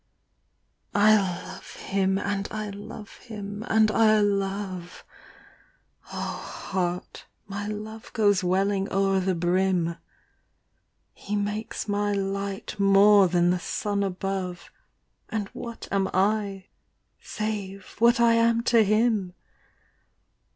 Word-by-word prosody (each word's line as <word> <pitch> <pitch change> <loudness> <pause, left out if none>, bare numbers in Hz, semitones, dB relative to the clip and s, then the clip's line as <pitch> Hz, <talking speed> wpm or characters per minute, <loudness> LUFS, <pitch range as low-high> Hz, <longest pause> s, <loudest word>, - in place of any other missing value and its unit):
I 210 +1 +6
loire 185 -4 -2 0.3
bim, 195 -1 +2
and 200 0 -2
I 215 -1 -4
knre 210 +1 -9
him, 210 -2 -7
and 220 -1 +4
I 215 -1 +4
love: 195 -3 -2 1.1
Oh - - -4
heart, 180 -2 -4 0.2
mj 205 +1 -4
love 220 +1 -10
goes 205 -5 +3
welling 195 +2 +1
o'er 195 0 +2
the 185 0 0
bdm. 175 -1 +1 1.1
He 205 - -5
makes 210 +2 -3
my 205 0 0
light 200 +1 -3
more 200 0 +6
than 175 0 +3
the 180 - 0
son 200 +3 -2
above. 190 -2 -3 0.6
And 210 -2 -3
idiat 235 -1 -7
am 195 -1 +1
I 200 -1 +1 0.6
save 200 -3 -5
idiat 235 +2 +5
I 235 -1 +5
am 230 0 +3
to 235 -2 +5
him? 215 -3 +1
200 Hz, 110 wpm, -26 LUFS, 190-215 Hz, 1.1 s, I